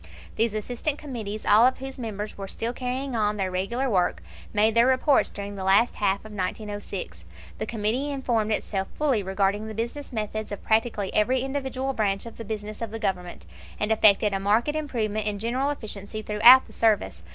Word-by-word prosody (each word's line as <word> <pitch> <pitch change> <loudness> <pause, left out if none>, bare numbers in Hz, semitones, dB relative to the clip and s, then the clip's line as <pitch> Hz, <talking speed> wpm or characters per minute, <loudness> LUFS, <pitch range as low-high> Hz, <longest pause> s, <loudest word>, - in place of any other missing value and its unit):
These 225 -1 0
assistant 245 +7 -2
committees, 220 -8 -6
all 210 +2 +6
of 260 - 0
whose 270 0 -7
members 215 -3 -5
were 195 -1 -6
still 230 +4 -3
carrying 255 +1 -3
on 210 -1 +1
their 190 -2 -1
regular 235 +9 -1
work, 185 -7 +1 0.3
made 215 +1 +3
their 235 +2 +5
reports 260 +2 +3
during 200 0 -7
the 190 - -5
last 195 +5 +3
half 200 0 0
of 215 - -10
1906. 195 - -5 0.4
The - - -3
Committee 230 +6 -1
informed 240 -6 0
itself 195 -2 -1
fully 275 -8 +1
regarding 195 +2 0
the 220 - -7
business 240 +7 -4
methods 215 -2 -4
of 205 - -6
practically 220 -3 0
every 245 +5 +2
individual 270 -1 -2
branch 200 -4 0
of 230 - -10
the 230 - -6
business 215 0 -6
of 230 - -3
the 225 - -5
Government, 180 - -3 0.3
and 210 +1 0
effected 210 -1 +4
a 195 - 0
marked 210 +7 +2
improvement 225 -9 -2
in 205 -1 -1
general 245 +6 -1
efficiency 215 -5 -5
throughout 235 +5 +7
the - - -16
service. 195 - +1
215 Hz, 185 wpm, -25 LUFS, 205-245 Hz, 0.4 s, throughout